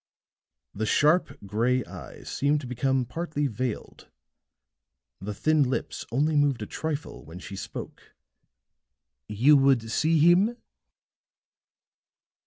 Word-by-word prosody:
The 110 +2 -3
sharp, 155 +9 +2
gray 120 +5 0
eyes - - -11
seemed 145 +2 +1
to - - -8
become 130 +1 0
partly 150 +2 -3
veiled, 125 -2 -4 1.1
the 105 +2 -6
thin 155 +6 +2
lips 130 -2 -2
only 150 +6 +1
moved 145 -6 +2
a - - -4
trifle 155 +5 -5
when 80 +3 -11
she 95 +2 -8
spoke. - - -9 1.1
"You 125 +8 +4
would 135 -5 +2
see 160 +6 +2
him?" 180 +9 +4
135 Hz, 110 wpm, -26 LUFS, 115-150 Hz, 1.1 s, You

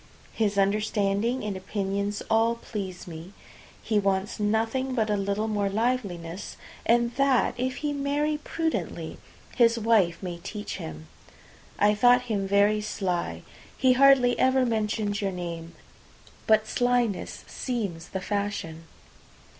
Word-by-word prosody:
His 210 -3 0
understanding 205 +3 +1
and 210 -2 -3
opinions 200 +1 -2
all 225 +1 +3
please 195 -6 -6
me; 170 +2 -9 0.5
he 215 -2 +2
wants 195 0 -1
nothing 225 +5 0
but 220 -3 +1
a - - +3
little 200 +2 -1
more 205 -2 0
liveliness, 200 -6 -2 0.3
and 235 0 +3
that, 275 -3 +3
if 255 +1 -2
he 295 - 0
marry 290 +2 0
prudently, 320 +1 -3 0.4
his 235 -1 +4
wife 215 -7 +3
may 175 -2 -5
teach 205 +4 -6
him. 80 0 -8 0.7
I 205 +1 +4
thought 245 +3 +5
him 205 -5 -2
very 205 +2 +3
sly; 190 -4 -2 0.3
he 260 -2 +4
hardly 260 -2 +5
ever 260 0 +4
mentioned 215 -2 -1
your 195 -1 0
name. 170 -2 -6 0.7
But 220 0 +4
slyness 245 -4 0
seems 200 -10 -4
the 190 - -4
fashion. 200 -6 -3
210 Hz, 130 wpm, -27 LUFS, 195-245 Hz, 0.7 s, thought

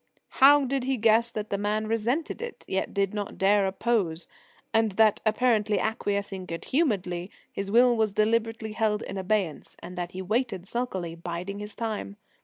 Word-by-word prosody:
How 285 +1 +8
did 265 0 -1
he 265 0 0
guess 225 +1 +4
that 215 -2 -5
the 200 - 0
man 210 +1 0
resented 230 - -1
it, 475 0 -7
yet 190 - -1
did 200 -1 0
not 205 -1 -4
dare 200 0 +3
oppose, 190 -5 -1 0.5
and 225 -2 +2
that, 215 +1 +4
apparently 215 -2 +2
acquiescing 200 -4 -2
good 165 0 -6
humouredly, 195 - 0 0.2
his 195 0 -4
will 240 +3 +5
was 220 -2 +1
deliberately 220 +1 0
held 215 -1 0
in 195 - -5
abeyance, 190 -5 -1
and 180 - -9
that 175 0 -4
he 185 - -5
waited 210 -2 -1
sulkily, 190 -9 -3
biding 175 +4 -5
his 210 0 -8
time? 220 -3 -4
210 Hz, 170 wpm, -27 LUFS, 195-230 Hz, 0.5 s, How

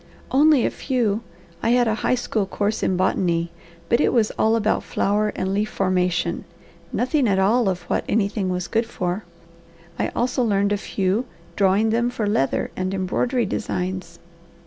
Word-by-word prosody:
"Only 290 -2 +5
a - - 0
few! 235 -6 -1 0.4
I - - +1
had 245 -1 +3
a 220 - +2
high - - +2
school 220 -4 -1
course 205 +2 -1
in 185 - +1
botany, 170 -2 +1 0.4
but 235 - +3
it - - +3
was 225 -4 +2
all 220 +1 +2
about 220 -1 +1
flower 210 +1 0
and 190 +1 -2
leaf 210 +2 0
formation, 180 -2 0 0.5
nothing 260 +1 +1
at 195 -2 +2
all 205 +3 +3
of 180 -1 -3
what - - -1
anything 200 -2 0
was 180 -1 -2
good 225 0 0
for. 180 -2 -3 0.7
I - - +1
also 250 +1 0
learned 200 -2 +2
a - - +1
few, 200 +3 -1 0.3
drawing 200 +3 +3
them 235 +2 +1
for 240 -3 -3
leather 170 -10 0
and 185 0 -2
embroidery 235 +6 0
designs." 180 -2 -3
205 Hz, 170 wpm, -22 LUFS, 185-230 Hz, 0.7 s, Only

